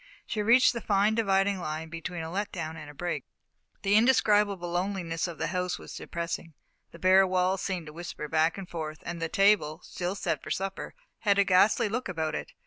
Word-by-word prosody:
She 215 - -4
had 210 - -1
reached 245 +3 +6
the 235 - -4
fine 205 +1 +2
dividing 200 -3 +2
line 160 -1 -4
between 165 +1 -5
a 160 - -6
let 205 +3 -2
down 160 -3 -5
and 155 -2 -9
a - - -10
break. 175 +3 -3 0.6
The 200 0 +2
indescribable 210 -6 +3
loneliness 175 -2 -1
of 170 -2 -7
the - - -2
house 180 0 -1
was - - -10
depressing. 170 -2 -5 0.3
The - - -13
bare 190 +2 +5
walls 185 +1 +1
seemed 185 -4 -3
to 150 - -10
whisper 165 -2 -6
back 160 +3 +2
and 195 -2 -7
forth, 155 -2 -6
and 170 -1 -5
the 165 - -1
table, 195 -6 +3
still 180 +2 -4
set 205 - -2
for - - -9
supper, 195 0 -4 0.2
had 200 -3 +2
a 200 - +6
ghastly 200 +5 +4
look 225 +1 -3
about 160 -3 -2
it. - - -5
185 Hz, 210 wpm, -28 LUFS, 165-200 Hz, 0.6 s, reached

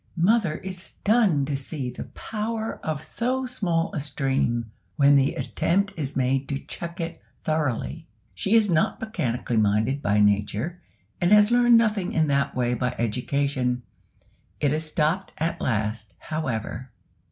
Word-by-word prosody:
Mother 185 -2 +3
is 185 -1 -5
stunned 200 - +2
to 145 0 -2
see 135 -2 -3
the 125 - -7
power 220 +1 -4
of 155 -1 -3
so 255 +2 -1
small 180 -9 -1
a 165 - -1
stream 135 -5 -1 0.2
when 140 +3 +5
the 140 0 +3
attempt 175 - 0
is 145 -3 -4
made 135 +1 0
to 140 - -1
check 170 +4 -7
it 165 -1 -4 0.2
thoroughly; 155 +1 -1 0.3
she 200 +3 +1
is 220 -2 +5
not 165 -4 +1
mechanically 125 - -2
minded 110 +6 +2
by 105 -2 +2
nature, 105 - +1 0.4
and 175 +2 +2
has 210 +1 +6
learned 240 -1 +6
nothing 215 -5 +1
in 160 - +3
that 140 0 +1
way 125 -1 +1
by 125 0 -1
education. 125 +2 -1 0.8
It 145 -1 +2
is 155 +1 -1
stopped 160 +4 0
at 165 +2 -2
last, 110 -4 -2
however. 130 - -4
150 Hz, 150 wpm, -25 LUFS, 125-190 Hz, 0.8 s, has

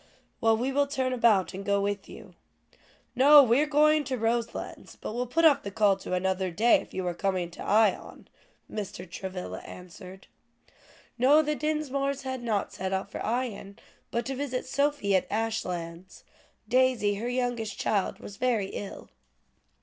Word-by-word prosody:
"Well, 225 -1 +4
we 255 +4 -1
will 285 +1 +2
turn 260 -2 -1
about 215 -7 +3
and 195 +1 -6
go 200 0 +1
with 200 0 -3
you." 205 -5 -12 0.8
"No, 285 +3 +8
we 240 +1 +3
were 300 - +2
going 305 +1 +4
to 255 0 -2
Roselands 230 0 -3
but - - -6
will 245 +2 -2
put 330 +7 +2
off 285 -3 +6
the 200 - -5
call 200 0 +3
to 185 - -4
another 190 0 -1
day, 220 +8 +3
if - - -14
you 185 - -4
were 175 -1 -2
coming 185 -2 -2
to - - -11
Ion," 215 -1 +1 0.4
Mr. 190 -3 -6
Travilla 185 +1 -6
answered. 180 +1 -12 0.9
"No, 290 +5 +5
the 300 0 0
Dinsmores 280 -2 -2
had 260 -1 -4
not 220 -4 -2
set 190 +1 -3
out 190 +1 -3
for - - -5
Ion, 220 -4 -3 0.3
but 235 - -2
to 270 - -3
visit 260 -2 -3
Sophie 280 -6 +1
at 185 - +1
Ashlands; 185 -5 -4 0.4
Daisy, 250 -4 +2
her 235 +4 -3
youngest 245 -3 -2
child, 200 -3 0
was 200 - -10
very 230 -6 0
ill." 200 - -7
225 Hz, 165 wpm, -28 LUFS, 195-260 Hz, 0.9 s, No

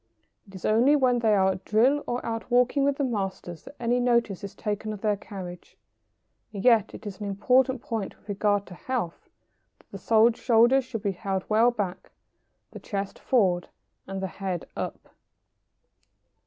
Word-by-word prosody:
It 195 - -14
is 185 - -7
only 240 +7 +4
when 255 -4 +3
they 220 -2 +3
are 190 -1 +3
at 185 0 -6
drill 255 +7 +3
or 245 +1 -3
out 225 0 -4
walking 250 +3 +3
with 280 0 +1
the 285 - 0
masters 195 - -4
that 285 - -12
any 245 +1 +1
notice 235 -6 +1
is 200 - -7
taken 210 0 -3
of 205 - -9
their 210 -2 +1
carriage. 185 -3 -9 0.7
And 200 0 -6
yet 225 -4 +4
it - - -11
is 200 -1 -7
an 205 - -4
important 250 +6 +2
point 220 -5 -4
with - - -29
regard 205 0 0
to - - -11
health 205 -3 -4 0.5
that - - -28
the 225 +1 +5
shoulders 245 +2 +4
should 225 -5 -6
be 200 - +1
held 190 0 -3
well 225 +3 +5
back, 200 -6 -4 0.6
the - - -9
chest 200 -1 -5
forward, 185 -8 +1 0.4
and 195 0 -5
the - - 0
head 185 0 -4
up. - - -6
215 Hz, 175 wpm, -26 LUFS, 195-245 Hz, 0.7 s, the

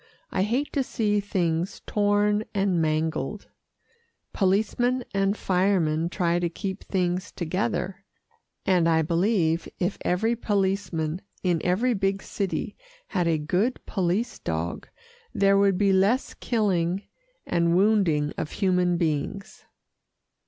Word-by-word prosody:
I 185 - 0
hate 240 +9 0
to 280 - +2
see 210 -5 0
things 175 -3 -1
torn 205 0 +2
and 195 -4 +2
mangled. 155 0 -1 0.8
Policemen 220 +6 +1
and 195 +1 +1
firemen 180 -4 +1
try 175 -2 +1
to 175 -1 0
keep 190 +3 -5
things 180 -1 -1
together, 190 +2 -2 0.6
and 175 -3 +3
I 160 -1 +3
believe 170 -1 +1
if 180 +2 -1
every 220 +7 +1
policeman 190 -6 -1 0.2
in 175 -3 +1
every 215 +8 +2
big 195 -1 -1
city 195 -2 -3 0.3
had 180 -4 0
a 165 -1 +2
good 180 +11 0
police 195 +6 -1
dog, 80 +1 -3 0.5
there 195 0 +4
would 200 -2 +3
be 200 -1 +3
less 200 +8 +2
killing 195 -5 0 0.4
and 170 0 +2
wounding 180 -7 +3
of 150 - -4
human 180 -3 +2
beings. 170 +4 -3
190 Hz, 120 wpm, -26 LUFS, 170-205 Hz, 0.8 s, there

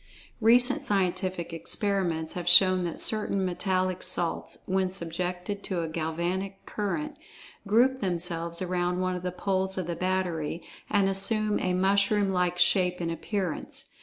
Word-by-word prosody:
Recent 245 +3 +5
scientific 185 -3 -1
experiments 170 -2 -1
have 175 -1 -2
shown 185 0 +6
that 170 - -5
certain 210 -3 0
metallic 185 0 -1
salts, 170 -1 0
when 190 0 0
subjected 180 +2 -3
to 175 -3 -2
a - - -3
galvanic 170 +5 -3
current, 290 +9 -3 0.5
group 250 +5 +3
themselves 170 -2 -1
around 180 0 -1
one 185 0 -1
of 180 - -5
the 180 0 -3
poles 190 +1 -1
of 185 - -2
the 170 0 -3
battery, 175 -3 -2 0.3
and 200 -2 +3
assume 210 +2 0
a 185 -1 0
mushroom 200 +1 +2
like 180 -1 0
shape 180 0 +3
and 170 -1 -2
appearance. 180 +1 -4
185 Hz, 140 wpm, -27 LUFS, 175-195 Hz, 0.5 s, shown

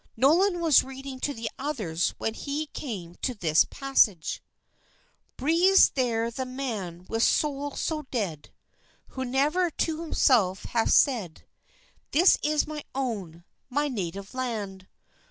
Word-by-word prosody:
Nolan 345 - +3
was 320 -5 +5
reading 270 0 -8
to 285 - -1
the 230 -4 -5
others 215 - -2
when 225 - -2
he 290 +5 -3
came 205 - -7
to 255 - -1
this 165 -6 +3
passage: 230 - +1 1.0
"Breathes 340 +8 +5
there 235 -3 0
the 260 +3 -4
man 220 -10 -5
with 225 0 -2
soul 285 +1 +1
so 305 -3 -3
dead 185 - -3 0.6
Who 260 - -5
never 290 +8 +1
to 320 0 -2
himself 230 - +2
hath 230 -1 0
said, 220 - +2 0.7
This 350 +5 +5
is 300 0 +1
my 300 -1 -6
own, 200 -11 -4 0.3
my 290 +3 0
native 195 -3 -5
land! 210 -7 -4
255 Hz, 130 wpm, -27 LUFS, 205-290 Hz, 1.0 s, was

